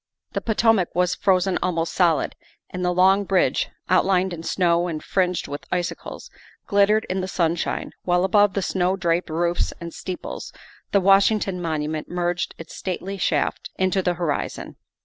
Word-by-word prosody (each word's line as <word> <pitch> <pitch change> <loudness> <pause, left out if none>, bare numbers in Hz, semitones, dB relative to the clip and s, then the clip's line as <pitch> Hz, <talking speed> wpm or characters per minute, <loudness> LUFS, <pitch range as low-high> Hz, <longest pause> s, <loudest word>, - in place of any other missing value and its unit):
The - - -2
Potomac 220 -4 +2
was 180 0 +2
frozen 190 -1 +2
almost 165 -2 -1
solid 170 -6 +2 0.4
and 180 0 -4
the 180 - +2
Long 190 +3 +4
Bridge, 195 -2 +1 0.2
outlined 185 0 +2
in 165 - -6
snow 170 0 +1
and 155 -3 -4
fringed 180 -2 0
with 145 +1 -7
icicles, 175 -1 -4 0.3
glittered 205 +1 +3
in 185 +1 -1
the 185 - -3
sun 170 -3 +1
shine, 170 - -3
while 180 0 +1
above 205 +1 +3
the 195 - 0
snow 185 0 +1
draped 170 -1 0
roofs 170 +2 0
and 170 -1 -7
steeples 185 -2 -6 0.4
the 200 - +4
Washington 195 -1 +3
Monument 155 -2 -3
merged 175 0 -2
its 165 - -10
stately 190 +1 -4
shaft - - 0
into 190 0 +1
the 180 -1 0
horizon. 170 -4 -3
180 Hz, 160 wpm, -23 LUFS, 170-190 Hz, 0.4 s, Long